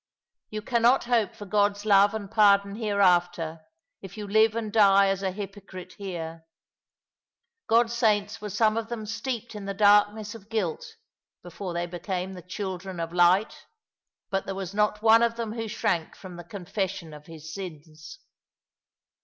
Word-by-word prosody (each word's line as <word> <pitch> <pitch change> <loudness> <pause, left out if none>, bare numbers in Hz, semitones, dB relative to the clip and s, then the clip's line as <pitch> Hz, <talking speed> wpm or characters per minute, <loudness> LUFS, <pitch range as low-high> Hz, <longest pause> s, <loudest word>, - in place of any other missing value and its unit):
You 215 -1 -5
cannot 240 +2 +3
hope 235 -5 0
for 205 - -9
God's 205 +1 +1
love 200 0 +5
and 205 -2 -6
pardon 200 -2 +4
hereafter, 175 -6 +1 0.4
if 195 +2 -11
you 210 - -5
live 220 +2 +3
and 220 -3 -4
die 200 -2 +5
as 195 0 -1
a 190 - 0
hypocrite 195 -1 -8
here. 165 -4 -6 1.2
God's 230 +1 +3
saints 210 -4 +1
were 210 - -5
some 215 +2 +2
of 225 -1 -3
them 230 -3 -5
steeped 235 +1 -4
in 210 -2 -7
the 200 0 -4
darkness 205 +1 +3
of 220 -2 -13
guilt 205 -8 -3 0.5
before 175 +1 -7
they 175 0 -1
became 180 +1 -4
the 180 - -9
children 185 0 -6
of 165 0 -4
light 180 +4 +2 0.3
— - - -64
but 195 0 -1
there 195 - -3
was 190 -1 -5
not 210 +1 0
one 225 0 +6
of 235 0 +2
them 230 -2 -4
who 225 -1 -4
shrank 170 -6 -2
from 185 -2 -11
the 175 - -9
confession 180 -2 -5
of 150 0 -13
his 160 -1 -10
Bins." 160 - -9
200 Hz, 165 wpm, -26 LUFS, 180-215 Hz, 1.2 s, one